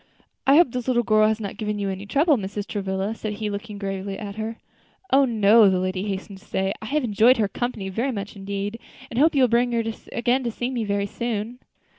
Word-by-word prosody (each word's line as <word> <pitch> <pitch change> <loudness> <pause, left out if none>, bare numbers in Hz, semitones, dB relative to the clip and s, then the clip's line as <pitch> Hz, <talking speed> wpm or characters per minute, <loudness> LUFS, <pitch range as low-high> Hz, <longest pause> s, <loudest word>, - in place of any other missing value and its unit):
"I 275 - +7
hope 325 -5 +5
this 250 0 -4
little 240 -2 +2
girl 215 -1 +4
has 220 0 0
not 200 -3 -5
given 210 -1 -2
you 200 -1 -2
any 190 +2 -6
trouble, 295 - +3
Mrs. 205 -2 -4
Travilla," 195 0 -2
said 215 -1 -4
he, 210 0 -3
looking 205 +1 -6
gravely 195 0 -4
at 200 -2 -6
her. 220 +1 -4 0.6
"Oh! 275 +1 +6
no," 220 -2 +5
the 190 - +2
lady 185 +1 -2
hastened 195 0 -5
to 205 - -21
say, 190 +1 -1
"I 220 - -6
have 300 +3 0
enjoyed 235 +3 +4
her 215 -2 +2
company 225 -2 -3
very 230 +8 -1
much 205 -3 -5
indeed, 200 +2 -4 0.3
and 235 - -1
hope 310 +2 +4
you 270 - +5
will - - +6
bring 240 +1 +2
her 230 -1 +1
to 225 0 -3
see - - -18
me - - -8
again 240 -1 0
very 200 0 0
soon." 230 +2 -4
215 Hz, 230 wpm, -24 LUFS, 200-240 Hz, 0.6 s, I